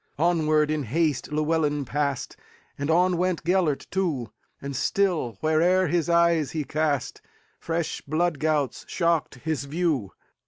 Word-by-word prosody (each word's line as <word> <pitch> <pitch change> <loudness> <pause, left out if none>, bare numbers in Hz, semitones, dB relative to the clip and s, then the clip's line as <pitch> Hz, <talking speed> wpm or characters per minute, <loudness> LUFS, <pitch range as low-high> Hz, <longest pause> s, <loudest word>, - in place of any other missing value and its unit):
Onward, 155 -2 +2
in 155 -1 0
haste, 150 +3 -1
Llewelyn 150 -1 0
passed, 140 0 -2 0.4
And 140 +2 -4
on 180 +2 +3
went 180 -2 0
Gêlert 170 -4 +1
too; 155 - -1 0.3
And 140 0 -6
still, 165 - 0
where'er 170 +3 +3
his 170 0 0
eyes 170 -3 +3
he 155 -2 -1
cast, 145 -2 -1 0.4
Fresh 165 -1 -2
blood 160 +1 0
gouts 150 -5 0
shocked 170 -5 0
his 155 -2 -2
view. 145 - -1
155 Hz, 130 wpm, -25 LUFS, 145-170 Hz, 0.4 s, on